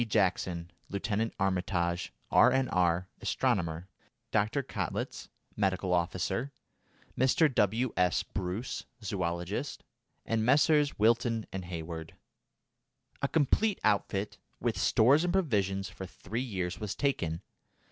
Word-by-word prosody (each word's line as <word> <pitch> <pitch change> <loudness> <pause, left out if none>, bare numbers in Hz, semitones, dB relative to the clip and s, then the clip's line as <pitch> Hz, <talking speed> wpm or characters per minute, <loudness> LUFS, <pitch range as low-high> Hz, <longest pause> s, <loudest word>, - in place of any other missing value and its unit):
Jackson; 90 -5 0 0.2
Lieutenant 105 +3 -1
Armitage, 90 -2 0 0.2
R.N.R., 90 -9 +4
astronomer; 90 -9 0 0.4
Dr. 110 +6 +1
Kottlitz, - - -4 0.3
medical 95 -2 0
officer; 90 +9 0 0.6
Mr. 135 +3 +3
W. 115 +3 +2
S. 90 0 +2
Bruce, 95 +5 -4 0.2
zoologist; 90 - -3 0.4
and 115 -1 0
Messrs. 145 +3 +4
Wilton 115 +1 +2
and 95 -1 -4
Heywood. 80 -2 -6 1.1
A 140 - +2
complete 165 +8 +2
outfit, 100 -1 0 0.2
with - - 0
stores 140 +8 +4
and 180 - +1
provisions 100 - +1
for 95 0 -8
three 110 +6 -5
years 95 -8 -3
was 105 -3 -3
taken. 85 - -1
100 Hz, 105 wpm, -30 LUFS, 90-125 Hz, 1.1 s, R.N.R